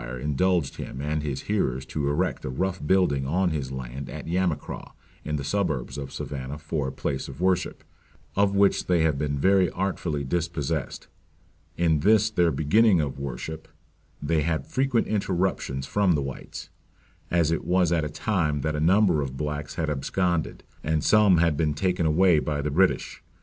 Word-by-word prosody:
indulged 75 +3 0
him 65 - -6
and 75 +2 -1
his 70 -3 -4
hearers 65 +1 -1
to 70 +1 -2
erect 90 +6 -1
a - - -4
rough 90 +7 -2
building 75 -8 +2
on 90 +4 +1
his 70 -4 -3
land 65 +1 -6
at - - -7
Yamacraw, 90 -1 -2 0.3
in 75 - -2
the 70 - -3
suburbs 75 -8 -1
of 70 -2 -6
Savannah 70 0 -5
for 75 -2 -3
a - - -3
place 70 0 -3
of 70 0 -10
worship, 95 0 0 0.5
of 100 0 +2
which 100 0 +3
they 85 -3 +3
have 75 -4 +1
been 70 -1 -1
very 95 +3 +4
artfully 90 -6 -2
dispossessed. 80 -1 -2 0.7
In 80 -3 +2
this 110 +5 +4
their 90 -5 +3
beginning 95 +6 +3
of 70 -3 -2
worship 70 +4 -6 0.5
they 75 +2 0
had 80 +1 -1
frequent 130 -3 +1
interruptions 95 -9 -1
from 100 -3 +2
the 75 -3 0
whites; 70 -1 -8 0.6
as 85 -2 +2
it 80 - -1
was 90 -2 +2
at 85 -2 +2
a 75 - -2
time 75 -4 -1
that 75 +2 -1
a - - -1
number 90 -1 +4
of 65 -1 -4
blacks 75 0 -4
had 80 - -1
absconded, 85 +4 -1 0.2
and 80 0 0
some 105 -4 +5
had 85 -2 +3
been 75 -1 0
taken 90 +1 0
away 85 +1 +4
by 75 -1 -2
the 75 - -1
British. 95 +5 +1
80 Hz, 175 wpm, -26 LUFS, 70-90 Hz, 0.7 s, some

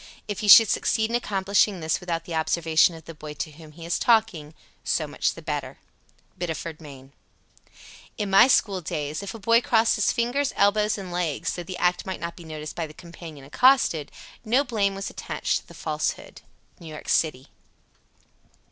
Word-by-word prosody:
If 205 -2 -4
he 215 - -3
should 220 +2 +10
succeed 220 +2 0
in - - 0
accomplishing 200 -3 +1
this 160 -1 -1
without 170 -2 -4
the 170 - -7
observation 160 +1 +2
of 160 - -13
the 165 - -9
boy 150 -1 -9
to 155 - -5
whom 155 0 -14
he 165 +1 -11
is 170 - -1
talking, 200 -10 +1 0.3
so - - 0
much - - -2
the - - -11
better. - - -4 0.6
Biddeford, 165 -2 -5
Me. 135 -3 -12 0.7
69. - - -18
"In 210 -2 -2
my 195 +6 +7
school 200 -7 +2
days, 150 0 -4
if 200 +2 -7
a - - -6
boy 230 +3 +3
crossed 230 -1 +2
his 210 - +2
fingers, 255 +4 -1
elbows, 210 +1 +2
and 190 -3 -7
legs, 165 -2 -2
though 175 - -5
the 180 +1 -7
act 180 0 +1
might 190 - -4
not 170 0 -5
be 170 - -12
noticed 155 -1 -7
by 165 -2 -3
the 155 - -15
companion 170 -5 -11
accosted, 210 - +3 0.3
no 245 +5 +2
blame 205 -6 0
was 195 0 -5
attached - - -2
to - - -28
the - - -14
falsehood." - - -4 0.4
_New 165 - -10
York 155 -1 -9
city. 135 -5 0
175 Hz, 190 wpm, -25 LUFS, 160-210 Hz, 0.7 s, should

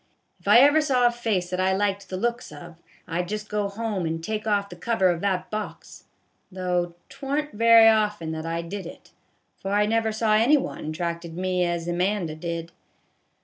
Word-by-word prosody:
If - - -16
ever 285 +5 +7
I - - +6
saw 265 -5 +2
a 240 - +5
face 215 -7 -2
that 180 - -2
I 190 0 +2
liked 200 0 -1
the 185 - -4
looks 235 +1 -2
of, 160 +3 -12 0.3
I 170 +1 -1
'd 175 - -7
just 210 +1 -5
go 210 -1 -1
home 200 -4 -3
and 165 0 -4
take 215 +3 -3
off 200 -1 +1
the 175 - -9
cover 190 0 +1
of 170 -1 -3
that 190 -2 -1
box, 215 -1 -7 0.5
though 180 -2 -2
't 275 - -17
warn't 290 +2 -2
very 230 0 +6
often 210 -7 +2
that 160 0 -5
I 165 +1 -2
did 190 +1 -6
it, - - -13 0.5
for 195 +1 -4
I 210 0 +3
never 225 +1 +1
saw 220 0 +1
any 235 +8 +5
one 270 - -5
t' - - -3
attracted 170 +1 -4
me 185 0 0
as 170 -1 -2
Amanda 180 -1 -1
did. 165 +1 -5
200 Hz, 205 wpm, -25 LUFS, 175-220 Hz, 0.5 s, ever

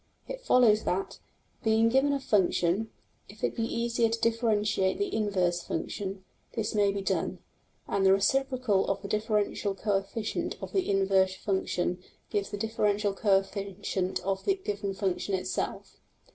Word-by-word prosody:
\] - - -39
It - - -6
follows 240 - +4
that, 190 +2 -2 0.4
being 220 0 +4
given 265 +4 +3
a 280 - 0
function, 200 -2 +1 0.4
if - - -14
it - - 0
be 230 - -1
easier 235 0 +1
to 230 0 -2
differentiate 215 -4 +1
the 405 -1 -2
inverse 185 -5 +1
function, 190 +3 -4 0.3
this 220 -2 -2
may 205 -2 +3
be 200 0 -3
done, - - -1 0.5
and 195 - 0
the 190 - +6
reciprocal 250 +1 +2
of 195 0 -1
the - - -4
differential 210 -1 0
coefficient 205 +2 -2
of - - -7
the 380 -2 +1
inverse 190 -1 +3
function 180 -3 -1 0.3
gives 200 -1 -1
the 205 - -4
differential 210 -1 0
coefficient 195 -2 0
of 195 0 -2
the 390 - +2
given 205 - -4
function 195 0 -1
itself. 185 - -4
205 Hz, 150 wpm, -29 LUFS, 195-225 Hz, 0.5 s, the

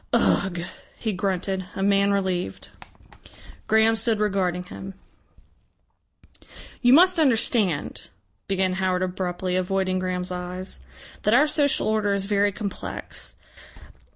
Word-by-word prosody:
"Ugh!" 180 -3 +2 0.4
he 220 -2 -2
grunted, 190 0 -2
a 195 - -2
man 200 0 +3
relieved. 185 - -2 1.0
Graham 220 +1 +4
stood 225 -1 +1
regarding 190 -4 0
him. 190 +1 -9 1.9
"You 245 - +5
must 360 +5 +6
understand," 225 - +1 0.4
began 190 -1 +1
Howard 185 -1 0
abruptly, 180 0 -2
avoiding 185 0 0
Graham's 185 0 -3
eyes, 180 - -6 0.3
"that 210 +3 +3
our 290 +4 +6
social 295 -2 +1
order 215 -2 +1
is 195 -1 0
very 205 0 +2
complex. 200 0 -6
195 Hz, 110 wpm, -24 LUFS, 185-215 Hz, 1.9 s, must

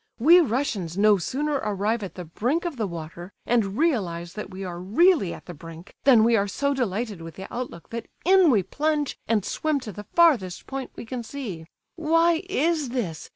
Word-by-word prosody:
We 325 +9 +7
Russians 215 - -1
no 210 0 +5
sooner 290 - -1
arrive 210 +2 -1
at 195 - -7
the 180 - -7
brink 250 - -1
of 340 -4 -3
the 220 -4 -2
water, 170 +2 -8
and 220 -4 +1
realize 180 - 0
that 210 -1 -6
we 190 0 -7
are 175 -2 -5
really 225 - +3
at - - -9
the 175 - -8
brink, 165 +3 -12
than 245 -6 +7
we 230 +1 +4
are 200 -2 +2
so 280 +8 0
delighted 220 -6 -2
with 165 0 -9
the 190 - -7
outlook 240 -9 -6
that 230 0 -5 0.2
in 375 -1 +6
we 215 -8 +3
plunge 295 - -1
and 215 -4 +1
swim 310 -2 -1
to 220 - -7
the 205 +2 -10
farthest 260 - +3
point 270 -1 -5
we - - -8
can 245 +1 -5
see. 220 -10 -7 0.3
Why 330 +1 +3
is 315 -4 +1
this? 205 -11 -4
225 Hz, 200 wpm, -25 LUFS, 185-285 Hz, 0.3 s, We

